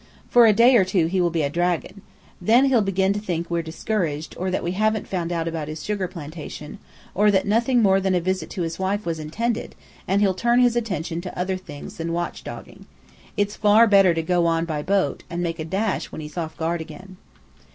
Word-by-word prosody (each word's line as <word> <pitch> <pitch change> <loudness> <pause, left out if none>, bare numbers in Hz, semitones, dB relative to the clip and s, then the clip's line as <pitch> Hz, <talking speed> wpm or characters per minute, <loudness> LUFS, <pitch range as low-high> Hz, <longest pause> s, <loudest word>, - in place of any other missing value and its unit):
For 240 -1 +7
a - - +7
day 235 +4 +6
or 200 - +5
two 185 -2 +1
he 185 +3 0
will 175 - +2
be 165 -2 -1
a 140 - 0
dragon. 175 +4 -1 0.4
Then 235 +8 +5
he'll 260 -4 +3
begin 195 -1 +1
to 205 - -3
think 170 -4 -4
we're 170 0 +1
discouraged, 165 -2 -3
or 185 +1 -2
that 185 - -2
we 170 - -1
haven't 215 +2 0
found 175 -3 -3
out 165 -1 -1
about 160 -2 -3
his 155 0 -6
sugar 205 -3 -2
plantation, 155 -2 -8 0.3
or 210 +2 +3
that 190 -2 +2
nothing 235 +3 +2
more 195 -1 +4
than 190 -1 +1
a - - +3
visit 185 +2 -2
to 180 - -3
his 165 +1 -4
wife 200 +2 -1
was 165 -2 -2
intended, 225 +10 -3 0.3
and 195 +2 +2
he'll 200 -2 +3
turn 235 +6 +2
his 245 -1 +4
attention 180 -8 -2
to 180 0 -7
other 185 +1 -1
things 165 -6 -9
than 165 0 -3
watch 175 0 -3
dogging. - - -10 0.5
It's 205 0 0
far 210 +2 +5
better 195 -5 +5
to 165 - -1
go 175 0 +2
on 165 0 +1
by 155 -3 -3
boat, 195 +4 0
and 175 +1 -3
make 165 -1 -3
a 155 - -3
dash 195 +5 -2
when - - -7
he's 150 -1 -8
off 160 -2 -4
guard 165 +1 -1
again." 185 +4 -11
185 Hz, 225 wpm, -23 LUFS, 165-205 Hz, 0.5 s, For